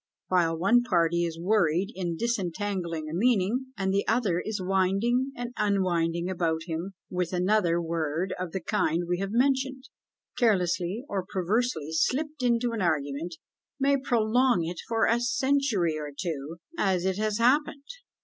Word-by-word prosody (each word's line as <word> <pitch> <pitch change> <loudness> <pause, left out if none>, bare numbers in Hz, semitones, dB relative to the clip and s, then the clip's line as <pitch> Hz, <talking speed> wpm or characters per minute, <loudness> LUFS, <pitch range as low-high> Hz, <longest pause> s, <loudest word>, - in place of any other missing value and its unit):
While 170 -3 +2
one 200 +8 +4
party 170 -6 +2
is 165 -1 -4
worried 185 0 +2
in 175 -3 -3
disentangling 185 -6 -2
a 155 - -6
meaning, 235 +5 +1
and 190 -1 0
the 200 - +2
other 220 -7 +1
is 215 -1 -3
winding 195 +8 +1
and 245 0 -5
unwinding 175 -4 +1
about 170 -3 -1
him 170 +3 -4 0.2
with 180 -1 -2
another, 180 -1 +2
a 170 - -1
word 165 +2 -2
of 180 -2 -4
the 190 - -3
kind 165 +1 0
we 175 0 -1
have 195 0 -2
mentioned, 265 +2 0 0.5
carelessly 195 0 +1
or 195 -2 -2
perversely 195 - 0
slipped 285 - 0
into 240 -1 +2
an 225 -2 -3
argument, 155 0 -1 0.4
may 280 +1 +3
prolong 245 -5 +2
it 170 +1 -5
for 225 -1 +2
a 230 +1 +3
century 240 - +1
or 150 -1 -5
two 160 -2 -4 0.2
as 185 -3 +1
it 190 +1 0
has 215 -1 0
happened! 280 +4 +2
190 Hz, 155 wpm, -27 LUFS, 170-235 Hz, 0.5 s, one